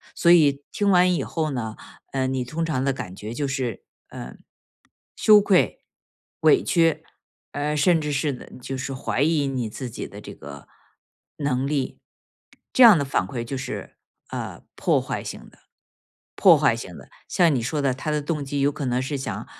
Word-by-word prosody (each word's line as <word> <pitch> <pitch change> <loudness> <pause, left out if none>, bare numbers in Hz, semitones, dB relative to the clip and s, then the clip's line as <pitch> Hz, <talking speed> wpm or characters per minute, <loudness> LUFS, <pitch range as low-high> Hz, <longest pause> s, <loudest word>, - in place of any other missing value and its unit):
所 170 - +4
以 145 -4 +5
听 205 -1 0
完 180 0 +5
以 - - -1
后 160 -2 -2
呢， 110 -4 -4 0.4
呃， 130 -1 0
你 130 -1 -1
通 160 +6 -3
常 140 -5 -1
的 135 -1 +1
感 90 -6 -7
觉 105 +3 -7
就 145 +2 -2
是， 130 -3 -3 0.3
呃， - - -9 0.8
羞 210 -1 +6
愧、 195 -2 +2 0.6
委 405 - +5
屈， 165 -2 +2 0.5
呃， 150 +1 -1
甚 165 +3 +3
至 150 - -3
是 140 -1 0 0.3
就 135 +2 -5
是 135 +1 -4
怀 130 +1 -2
疑 150 -3 +2
你 130 -4 -2
自 125 +3 -6
己 - - -6
的 - - -11
这 - - -9
个 70 0 -11 0.7
能 135 -2 -1
力， 140 -3 -2 0.7
这 255 - +6
样 225 -5 +10
的 - - 0
反 110 -8 0
馈 120 +3 -4
就 135 +3 -5
是， - - -6 0.3
呃， - - -6
破 - - +2
坏 - - -4
性 - - -8
的 - - -24 0.8
破 - - +7
坏 - - +3
性 - - -8
的， - - -14 0.2
像 170 -4 +3
你 130 - 0
说 145 +5 -2
的， 135 -2 +1
他 135 +4 -5
的 150 -1 0
动 150 -1 -2
机 140 +1 -2
有 145 +1 +3
可 140 -1 -5
能 125 0 0
是 140 +2 -3
想， 135 - -5
140 Hz, 200 characters per minute, -24 LUFS, 130-160 Hz, 0.8 s, 样